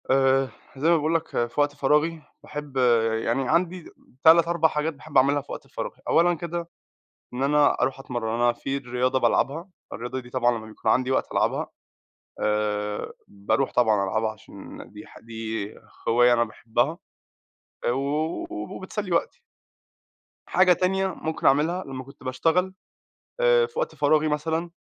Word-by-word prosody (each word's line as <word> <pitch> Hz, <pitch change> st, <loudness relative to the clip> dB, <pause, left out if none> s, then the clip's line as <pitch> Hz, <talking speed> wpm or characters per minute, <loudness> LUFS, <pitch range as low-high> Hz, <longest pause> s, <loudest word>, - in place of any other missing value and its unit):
آآ 135 Hz, 0 st, +3 dB, 0.3 s
زي 150 Hz, +5 st, +2 dB
ما 170 Hz, -, +6 dB
باقول 155 Hz, +2 st, 0 dB
لك 165 Hz, 0 st, 0 dB, 0.2 s
في 120 Hz, -, -7 dB
وقت 145 Hz, 0 st, +1 dB
فراغي 150 Hz, +3 st, +1 dB, 0.2 s
باحب 145 Hz, -2 st, -7 dB, 0.5 s
يعني 125 Hz, +2 st, 0 dB
عندي 175 Hz, 0 st, 0 dB, 0.3 s
3 165 Hz, +1 st, +7 dB
4 170 Hz, -1 st, +3 dB
حاجات 155 Hz, +1 st, -2 dB
باحب 150 Hz, +1 st, -4 dB
أعملها 140 Hz, +2 st, +4 dB
في 140 Hz, -, -13 dB
وقت -, -, -7 dB
فراغي. -, -, -6 dB
أولًا 175 Hz, +1 st, +4 dB
كده 170 Hz, +1 st, -5 dB, 0.7 s
إن 125 Hz, -, -3 dB
أنا 145 Hz, +1 st, +3 dB
أروح 135 Hz, +1 st, 0 dB
أتمرن، 120 Hz, -4 st, -3 dB
أنا 120 Hz, +1 st, +3 dB
في 135 Hz, +3 st, -3 dB
رياضة 125 Hz, 0 st, 0 dB
بالعبها. 160 Hz, +9 st, +1 dB, 0.2 s
الرياضة 125 Hz, +3 st, -4 dB
دي 120 Hz, -1 st, -14 dB
طبعًا 120 Hz, -2 st, +1 dB
لما 110 Hz, -, -10 dB
بيكون 110 Hz, -, -2 dB
عندي 130 Hz, 0 st, +2 dB
وقت 130 Hz, -, 0 dB
ألعبها -, -, 0 dB, 0.7 s
آآ 105 Hz, -1 st, -1 dB, 0.2 s
باروح 100 Hz, +7 st, -1 dB
طبعًا 110 Hz, -5 st, +3 dB
ألعبها 110 Hz, +3 st, 0 dB
عشان 110 Hz, -, -12 dB
دي -, -, -11 dB
ح -, -, -14 dB
دي 110 Hz, -2 st, -5 dB, 0.3 s
هواية 120 Hz, +1 st, +5 dB
أنا 120 Hz, -1 st, +3 dB
باحبها، 120 Hz, +7 st, -2 dB, 0.9 s
آآ -, -, +3 dB
و 145 Hz, +6 st, -1 dB
وبتسلي 190 Hz, -, -5 dB
وقتي. 170 Hz, -, -1 dB, 1.1 s
حاجة 185 Hz, -1 st, +5 dB
تانية 190 Hz, +2 st, +1 dB
ممكن 160 Hz, -4 st, -5 dB
أعملها 160 Hz, +7 st, +2 dB
لما 130 Hz, -1 st, -7 dB
كنت 135 Hz, 0 st, -16 dB
باشتغل 165 Hz, +8 st, +1 dB, 0.7 s
آآ 485 Hz, -1 st, +4 dB
في 465 Hz, 0 st, -10 dB
وقت -, -, -1 dB
فراغي 155 Hz, +1 st, +2 dB
مثلًا، 160 Hz, +3 st, -1 dB
140 Hz, 155 wpm, -25 LUFS, 120-165 Hz, 1.1 s, 3